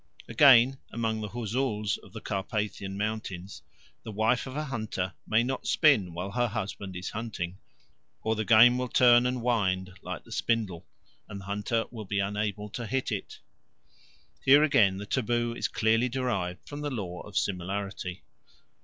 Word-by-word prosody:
Again, 135 -2 +6
among 110 -1 -1
the 105 - -4
Huzuls 110 -2 -1
of - - -17
the - - -8
Carpathian 100 0 -3
Mountains 100 -3 -4 0.4
the 110 - -8
wife 110 +5 +1
of 130 +2 -6
a 155 - -1
hunter 110 -9 -3
may 110 +1 +3
not 130 +2 -3
spin 105 - +3
while 90 +3 -4
her 120 +3 +1
husband 100 -3 -5
is 90 +1 -5
eating, 100 -5 -4 0.6
or 110 0 +1
the 110 - -1
game 115 +3 +7
will 125 - -1
turn 120 0 +5
and 125 -1 -2
wind 95 -6 0
like - - -6
the - - -17
spindle, 105 -8 -1 0.4
and 100 - -6
the - - -12
hunter 105 +3 -1
will 110 -3 -7
be 100 +1 -2
unable 105 +1 -1
to 115 +2 -5
hit 130 +4 -1
it. - - -4 1.1
Here 140 +3 +7
again 105 -10 +4
the 100 - -6
taboo 120 0 0
is - - -1
clearly 115 +3 +2
derived 115 -9 -2
from 145 0 -6
the 145 - -2
law 95 -9 -5
of 105 -3 -7
similarity. 95 +1 -3
110 Hz, 165 wpm, -28 LUFS, 100-120 Hz, 1.1 s, game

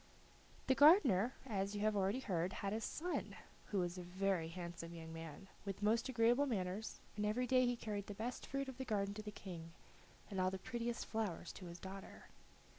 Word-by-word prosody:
The 265 - +5
gardener, 265 - +7
as 200 -4 -1
you 205 - -2
have 215 0 +3
heard 205 - +2 0.2
already, - - -1 0.4
had 200 0 -1
a 220 - -1
son, 350 +9 -2 0.3
who 205 - -1
was 175 0 0
a - - -4
very 180 -1 0
handsome 170 0 -6
young 160 -1 -7
man, 165 +3 -7 0.2
with 195 0 -4
most 225 +4 +3
agreeable 240 +3 +4
manners, 200 -2 -2 0.2
and 210 - -1
every 215 +4 +2
day 255 0 +5
he 245 - +2
carried 205 -3 -3
the 205 - -5
best 235 +4 -4
fruit 275 0 -1
of 265 -1 -7
the - - -1
garden 200 -3 0
to 215 - -5
the 210 - -5
King, 170 -5 -7 0.6
and 190 -2 0
all 185 - +4
the 190 - -3
prettiest 235 +3 -2
flowers 210 -6 -2
to 185 - -8
his 170 0 -7
daughter. 190 +2 -8
205 Hz, 200 wpm, -39 LUFS, 185-235 Hz, 0.6 s, gardener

